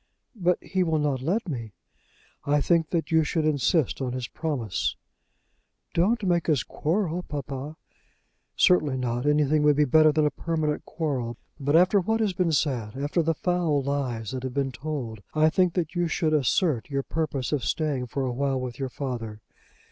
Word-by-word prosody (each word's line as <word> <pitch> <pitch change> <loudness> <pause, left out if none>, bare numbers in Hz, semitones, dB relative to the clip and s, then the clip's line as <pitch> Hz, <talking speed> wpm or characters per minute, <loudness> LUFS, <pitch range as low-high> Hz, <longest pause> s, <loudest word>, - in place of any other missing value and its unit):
"But 180 -4 +2
he 190 -1 -1
will 160 -3 +2
not 145 -4 0
let 190 - -1
me." 115 - -5 0.7
"I 145 +1 +2
think 165 +1 +2
that 165 -2 -1
you 160 -1 +4
should 155 +1 0
insist 150 0 +1
on 125 -2 -2
his 130 -2 -3
promise." 135 - -2 1.0
"Don't 210 +7 +2
make 175 -3 +1
us 150 -5 +2
quarrel, 175 +1 -1
papa." 140 -1 -6 0.8
"Certainly 150 -7 +3
not. 125 +1 -2
Anything 150 0 +3
would 150 -1 +4
be 150 +1 +4
better 155 +3 +5
than 150 0 +2
a 150 - +2
permanent 155 -3 -2
quarrel. 130 -8 -3 0.2
But, 145 +2 +1
after 185 +4 +5
what 220 +5 0
has 210 -4 +1
been 180 -2 +1
said, 130 -7 -1
after 145 +5 0
the 165 0 0
foul 170 -5 0
lies 130 -6 -2
that 130 - -4
have 130 0 -5
been 135 -1 0
told, 130 -6 -5
I 155 +1 +4
think 180 0 +2
that 170 -4 -1
you 175 -1 0
should 155 0 0
assert 150 - +1
your 140 -1 -1
purpose 145 -6 -2
of 145 -5 0
staying 140 -1 -1
for 135 +3 -2
awhile 135 +1 -1
with 125 -1 -6
your 135 -1 -2
father. 120 -6 -5
150 Hz, 180 wpm, -26 LUFS, 130-165 Hz, 1.0 s, better